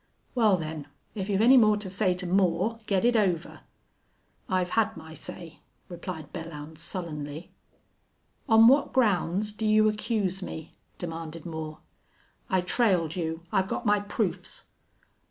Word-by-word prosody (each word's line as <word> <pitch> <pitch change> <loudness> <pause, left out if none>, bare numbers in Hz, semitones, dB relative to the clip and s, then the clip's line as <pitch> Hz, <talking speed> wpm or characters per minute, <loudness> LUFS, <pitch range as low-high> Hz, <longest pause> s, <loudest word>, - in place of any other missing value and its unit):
Wal, 220 -6 +4
then, 155 -3 -5 0.3
if 200 -2 -4
you've 200 0 +2
any 260 +3 +8
more 215 -3 +5
to 205 -2 -4
say 185 -1 +1
to 180 0 -5
Moore 190 +4 +1
get 195 +1 +2
it 240 0 +4
over." 185 -6 0 0.9
"I've 185 -2 0
had 220 -3 +1
my 160 0 -10
say," 165 0 -9 0.3
replied 175 -2 -7
Belllounds, 160 -2 -8
sullenly. 155 -3 -6 1.0
"On 225 0 +8
what 275 +3 +4
grounds 210 -3 +2
do 210 +1 -7
you 215 0 +5
accuse 210 -3 -1
me?" 160 -3 -7 0.2
demanded 165 -2 -6
Moore. 155 -2 -6 0.7
"I 185 -1 +2
trailed 180 -4 +1
you. 165 -1 -3
I've 190 0 +2
got 235 - -3
my 210 -1 +4
proofs." 200 -4 -3
185 Hz, 140 wpm, -27 LUFS, 165-210 Hz, 1.0 s, any